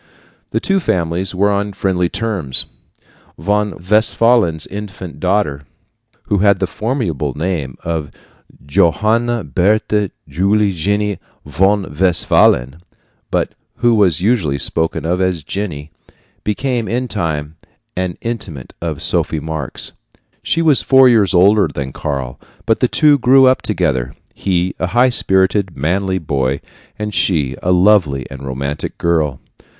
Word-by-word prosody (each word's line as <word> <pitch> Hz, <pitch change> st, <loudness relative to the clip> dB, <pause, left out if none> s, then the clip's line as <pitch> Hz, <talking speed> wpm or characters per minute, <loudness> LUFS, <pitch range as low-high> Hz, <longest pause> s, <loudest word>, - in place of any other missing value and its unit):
The -, -, -1 dB
two 195 Hz, 0 st, +1 dB
families 90 Hz, -, -1 dB
were 100 Hz, +2 st, +2 dB
on 100 Hz, 0 st, -1 dB
friendly 90 Hz, -3 st, 0 dB
terms. 100 Hz, -, -2 dB, 0.7 s
Von 105 Hz, 0 st, 0 dB
Westphalen's 110 Hz, -5 st, +3 dB
infant 95 Hz, -6 st, -8 dB
daughter, 85 Hz, -7 st, -1 dB, 0.6 s
who 100 Hz, -, 0 dB
had 100 Hz, 0 st, +4 dB
the 95 Hz, -, 0 dB
formidable 105 Hz, -, -3 dB
name 80 Hz, -6 st, -3 dB
of 80 Hz, -3 st, -3 dB, 0.6 s
Johanna 110 Hz, +9 st, +1 dB
Bertha 105 Hz, +5 st, +1 dB, 0.2 s
Julie 100 Hz, +7 st, +1 dB
Jenny 100 Hz, +4 st, -1 dB, 0.3 s
von 95 Hz, +7 st, +2 dB
Westphalen, 80 Hz, -5 st, +2 dB, 0.5 s
but -, -, -1 dB, 0.2 s
who 120 Hz, -1 st, +2 dB
was 95 Hz, -8 st, +3 dB
usually 95 Hz, -, +1 dB
spoken 80 Hz, +3 st, -1 dB
of 90 Hz, +3 st, 0 dB
as 90 Hz, -4 st, 0 dB
Jenny, 80 Hz, -5 st, -5 dB, 0.5 s
became, 120 Hz, +2 st, -1 dB
in 125 Hz, +2 st, -1 dB
time, 80 Hz, -7 st, -3 dB, 0.4 s
an 90 Hz, -1 st, -3 dB
intimate 100 Hz, -, -6 dB
of 80 Hz, -4 st, -3 dB
Sophie 80 Hz, -, 0 dB
Marx. 80 Hz, -3 st, -4 dB, 0.5 s
She 165 Hz, -, 0 dB
was 155 Hz, -4 st, +4 dB
four 130 Hz, -1 st, +6 dB
years 105 Hz, -5 st, +3 dB
older 100 Hz, +3 st, +5 dB
than 65 Hz, -2 st, -6 dB
Karl, 70 Hz, -4 st, -4 dB, 0.3 s
but 115 Hz, -, +2 dB
the 125 Hz, -, +3 dB
two 150 Hz, +2 st, +4 dB
grew 130 Hz, +2 st, +5 dB
up 130 Hz, 0 st, +3 dB
together -, -, -1 dB, 0.2 s
he 90 Hz, -1 st, -1 dB
a 90 Hz, -, 0 dB
high 120 Hz, +7 st, +3 dB
spirited, 95 Hz, -4 st, +2 dB
manly 95 Hz, +6 st, 0 dB
boy, 70 Hz, -5 st, -1 dB, 0.4 s
and 105 Hz, 0 st, -4 dB
she 80 Hz, -8 st, +1 dB
a 90 Hz, -, 0 dB
lovely 90 Hz, -, +3 dB
and 70 Hz, 0 st, -8 dB
romantic 70 Hz, +2 st, -4 dB
girl. 80 Hz, -6 st, 0 dB
95 Hz, 130 wpm, -17 LUFS, 80-105 Hz, 0.7 s, four